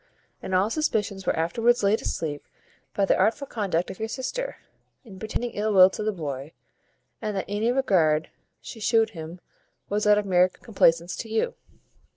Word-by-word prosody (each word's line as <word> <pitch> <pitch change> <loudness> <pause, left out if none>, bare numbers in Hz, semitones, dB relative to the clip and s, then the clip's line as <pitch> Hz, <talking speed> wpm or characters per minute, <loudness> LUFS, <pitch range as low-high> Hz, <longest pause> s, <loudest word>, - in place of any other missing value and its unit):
And 185 - -2
all 195 +4 +2
suspicions 210 -10 -1
were - - +2
afterwards 230 +9 +1
laid 200 +2 +3
asleep 150 -3 -3 0.5
by 200 - +2
the - - +3
artful 225 +9 +1
conduct 195 -8 -2
of 190 - -11
your 220 - -2
sister, - - -4 0.5
in 190 -4 -12
pretending 230 +3 -3
ill 215 +1 -1
will 185 -1 +8
to - - -5
the 215 0 0
boy, 145 -5 -6 0.7
and 210 -3 -3
that 190 - -2
any 210 +4 0
regard 170 - +2 0.3
she 225 - -9
shewed 225 0 +2
him 165 -1 -8 0.5
was 210 +1 0
out 210 0 +6
of 210 - 0
meer 180 -1 +4
complacence 170 -5 +1
to 225 - -6
you." 225 - 0
205 Hz, 175 wpm, -25 LUFS, 180-225 Hz, 0.7 s, will